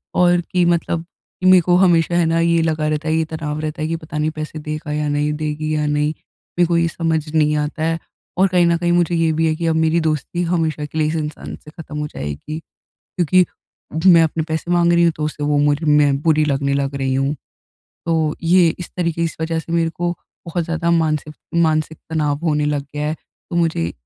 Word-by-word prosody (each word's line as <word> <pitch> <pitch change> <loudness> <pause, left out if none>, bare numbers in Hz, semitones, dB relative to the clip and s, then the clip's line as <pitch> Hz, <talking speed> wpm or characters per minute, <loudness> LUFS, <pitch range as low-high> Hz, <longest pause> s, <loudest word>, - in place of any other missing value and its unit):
और, 175 -1 +4
कि 180 +1 0
मतलब 170 -1 0 0.4
मेरे 185 -1 +7
को 175 +1 +2
हमेशा 175 -2 +3
है 175 -1 +3
ना 165 +1 +1
ये 170 0 +3
लगा 155 -1 0
रहता 155 +1 -2
है, 155 - +1
ये 160 0 +1
तनाव 155 -1 -4
रहता 155 +1 -4
है 155 - 0
कि, 165 - -1
पता 155 -2 -7
नहीं 150 +1 +1
पैसे 155 0 -6
देगा 155 0 -5
या 150 0 -1
नहीं 145 +1 0
देगी 155 0 -3
या 150 0 0
नहीं, 150 0 +1 0.5
मेरे 175 - +6
को 170 0 +1
ये 170 0 +2
समझ 160 -2 -1
नहीं 150 -1 +3
आता 150 +1 -2
है 165 +1 0 0.4
और 190 +2 +5
कहीं 180 -2 +3
न 170 0 +3
कहीं 175 0 0
मुझे 175 0 +2
ये 165 -1 +2
भी 160 +1 +1
है 155 - +1
कि 165 +1 -2
अब 160 - +2
मेरी 160 +1 +2
दोस्ती 155 +2 -1
हमेशा 160 -3 -1
के 150 - -8
लिए 155 -1 +2
इस 155 - -2
इंसान 150 -1 -5
से 150 - -15
ख़त्म 155 -2 -9
हो 150 - -2
जाएगी। 75 - -6 0.4
क्योंकि 180 +1 +2 0.7
मैं 170 -2 +7
अपने 160 0 0
पैसे 160 +2 -3
माँग 175 -1 +3
रही 170 0 +4
हूँ, 170 - +3
तो 150 - -2
उसे 150 -1 -4
वो 145 0 +2
मुर 145 +2 +2
मैं 150 -2 +4
बुरी 155 -1 +3
लगने 140 -1 0
लग 140 0 -1
रही 135 -1 -1
हूँ, 135 +2 0 0.7
तो 160 -2 +1
ये 175 0 +5
इस 180 - -7
तरीके 170 -2 -1
इस 165 - -3
वज़ह 160 0 -1
से 165 +1 -6
मेरे 165 -1 +1
को 175 +1 -2 0.3
बहुत 170 0 -2
ज़्यादा 165 +1 -1
मानसिफ 155 -2 0 0.2
मानसिक 160 -2 +1
तनाव 150 -3 0
होने 150 -2 +1
लग 145 -1 0
गया 150 0 -2
है, 155 - -1
तो 170 - -11
मुझे 160 - 0
160 Hz, 225 wpm, -19 LUFS, 150-170 Hz, 0.7 s, मेरे